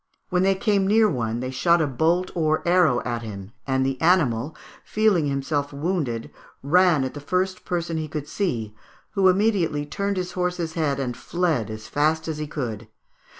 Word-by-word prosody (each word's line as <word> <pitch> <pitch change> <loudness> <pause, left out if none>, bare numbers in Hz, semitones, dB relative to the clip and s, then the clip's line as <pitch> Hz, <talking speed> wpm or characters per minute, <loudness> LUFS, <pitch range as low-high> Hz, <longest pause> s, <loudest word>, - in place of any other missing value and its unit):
When 180 -2 +1
they 195 +1 +3
came 200 -1 +1
near 215 +2 +5
one 120 - -2
they 130 0 -3
shot 170 +7 +3
a 160 - +2
bolt 165 +7 +1
or 155 -1 0
arrow 170 -8 +4
at 120 -1 -2
him, 100 -3 -8 0.2
and 130 0 +1
the 135 -1 -2
animal, 155 -6 +2 0.3
feeling 210 -8 +2
himself 140 +1 -1
wounded, 140 -6 -2 0.3
ran 170 0 +4
at 130 - -3
the 145 - -7
first 185 +5 -1
person 170 -2 -2
he 155 -1 -3
could 150 -1 -5
see, 115 - -2 0.4
who 195 -3 +4
immediately 185 -7 +1
turned 200 +6 -2
his 180 -1 -2
horse's 180 -2 -2
head 150 -4 0
and 125 -3 -2
fled 165 - -1
as 110 0 -7
fast 155 +2 +1
as 155 -2 -3
he 150 - -3
could. 115 -7 -5
155 Hz, 180 wpm, -24 LUFS, 130-180 Hz, 0.4 s, near